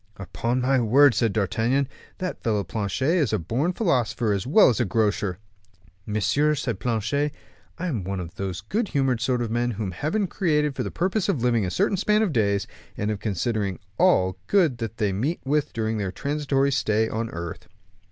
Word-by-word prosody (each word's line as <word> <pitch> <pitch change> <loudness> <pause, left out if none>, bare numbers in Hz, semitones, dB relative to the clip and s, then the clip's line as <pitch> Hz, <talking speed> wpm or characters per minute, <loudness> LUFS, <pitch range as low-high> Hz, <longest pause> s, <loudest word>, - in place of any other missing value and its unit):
"Upon 115 +7 -2
my 130 +1 +3
word," 130 +4 +5
said 115 0 +1
D'Artagnan, 115 +6 +1 0.3
"that 185 -1 -4
fellow 105 -3 0
Planchet 105 +5 -2
is 150 -9 +1
born 120 - 0
a - - -1
philosopher 120 - +1
as 100 +3 -2
well 205 +10 +6
as 120 - 0
a - - +3
grocer." 105 -2 0 0.7
"Monsieur," 140 +9 +2
said 120 -8 -3
Planchet, 125 +6 0 0.5
"I 180 - -4
am 125 - -2
one 95 +1 -3
of 85 -2 -6
those 95 -2 -4
good 210 - -1
humored 135 -7 0
sort 125 0 +1
of 115 - -4
men 120 +1 +1
whom 105 -4 -3
Heaven 155 - -1
created 150 -6 0
for - - -2
the - - -2
purpose 190 +3 -1
of 140 -11 0
living 120 -5 +2
a - - -2
certain 195 - +1
span 210 +3 +2
of 190 -8 0
days, 100 -3 +1 0.3
and 105 +1 -1
of 105 - -3
considering 100 -1 -1 0.2
all 95 - +3
good 160 - +3
they 110 -3 -2
meet 135 - -1
with 150 +2 0
during 110 -1 -2
their 100 -2 -2
transitory 140 +1 0
stay 110 -4 +1
on 115 +1 -3
earth." 85 -2 -7
120 Hz, 190 wpm, -25 LUFS, 105-145 Hz, 0.7 s, well